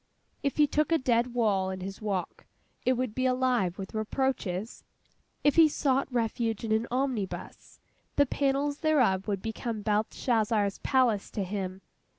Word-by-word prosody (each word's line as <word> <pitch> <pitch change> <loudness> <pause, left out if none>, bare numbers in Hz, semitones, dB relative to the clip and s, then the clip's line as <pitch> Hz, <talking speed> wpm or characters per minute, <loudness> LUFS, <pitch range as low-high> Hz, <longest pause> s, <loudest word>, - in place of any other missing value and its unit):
If 280 -2 -1
he 300 - +6
took 300 +2 0
a 330 - +5
dead 245 -2 +1
wall 200 -5 +2
in 190 0 -5
his 195 +3 -6
walk, 195 -5 -3 0.4
it 255 - +5
would 250 -3 -2
be 260 +2 +1
alive 250 -8 +1
with 190 -1 -7
reproaches. 220 -3 -2 0.6
If 290 - +3
he 325 -1 +8
sought 275 -2 0
refuge 230 -2 -1
in 225 - -3
an 220 +2 +1
omnibus, 250 -6 -3 0.4
the 285 - +5
panels 280 +1 0
thereof 250 - +2
would 200 -2 -2
become 225 -1 -4
Belshazzar's 215 -1 +1
palace 245 -7 +2
to 205 - -3
him. 190 -1 -4
230 Hz, 155 wpm, -29 LUFS, 205-265 Hz, 0.6 s, he